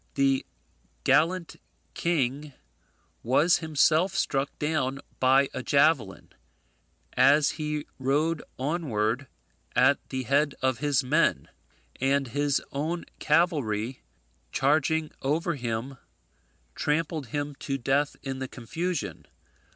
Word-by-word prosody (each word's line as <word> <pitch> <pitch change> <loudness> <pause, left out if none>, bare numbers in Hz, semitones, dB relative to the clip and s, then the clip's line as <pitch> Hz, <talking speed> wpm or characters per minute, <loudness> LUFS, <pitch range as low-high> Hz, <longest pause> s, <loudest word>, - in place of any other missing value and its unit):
The 135 -1 +2 0.6
gallant 170 +1 +2 0.4
king 145 -3 -1 0.7
was 145 +8 +3
himself 160 +4 +2
struck 140 -6 0
down 145 -3 -1 0.2
by 135 +2 +4
a 130 - -3
javelin, 140 -7 +1 0.8
as 140 +3 +5
he 150 -1 -3
rode 150 +5 +1 0.2
onward 130 -4 -1 0.5
at 130 +3 +4
the 130 -1 -3
head 140 +3 +1
of 130 -2 0
his 145 -1 +1
men, 130 - +1 0.5
and 135 0 +1
his 145 +2 0
own 160 +5 -3
cavalry 140 - +1 0.5
charging 155 +2 +1
over 160 +5 0
him 125 0 -4 0.7
trampled 150 - -1
him 145 +4 -3
to 135 - -2
death 135 +3 0
in 135 -1 -4
the 130 - -3
confusion. 120 - -4
140 Hz, 105 wpm, -27 LUFS, 130-155 Hz, 0.8 s, as